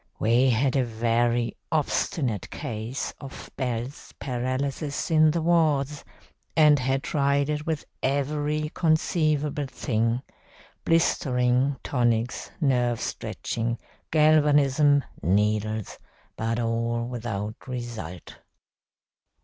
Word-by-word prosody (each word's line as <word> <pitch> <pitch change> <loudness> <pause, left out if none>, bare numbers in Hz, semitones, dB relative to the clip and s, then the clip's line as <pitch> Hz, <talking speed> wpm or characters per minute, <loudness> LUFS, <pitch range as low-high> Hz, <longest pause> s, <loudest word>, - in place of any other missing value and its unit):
We 120 +4 +3
had 125 +3 +2
a 135 - +3
very 115 0 0 0.2
obstinate 140 - 0
case 115 +3 -4
of 135 -2 -9
Bell's 125 +1 -4
paralysis 135 +4 -2
in 155 -1 +6
the 165 +1 0
wards, 150 -4 +2 0.5
and 150 -2 +6
had 135 +1 0
tried 140 0 +1
it 150 +1 -3
with 160 -3 -2 0.2
every 150 +2 0
conceivable 155 -3 +1
thing, 115 -1 -1 0.6
blistering, 130 -5 +2
tonics, 120 -2 0
nerve 125 -6 +2
stretching, 115 0 -3 0.3
galvanism, 145 -2 +4 0.2
needles, 105 +3 0 0.4
but 115 +1 -1
all 115 0 -1
without 110 -3 -5
result. 115 -9 -6
130 Hz, 95 wpm, -26 LUFS, 115-150 Hz, 0.6 s, in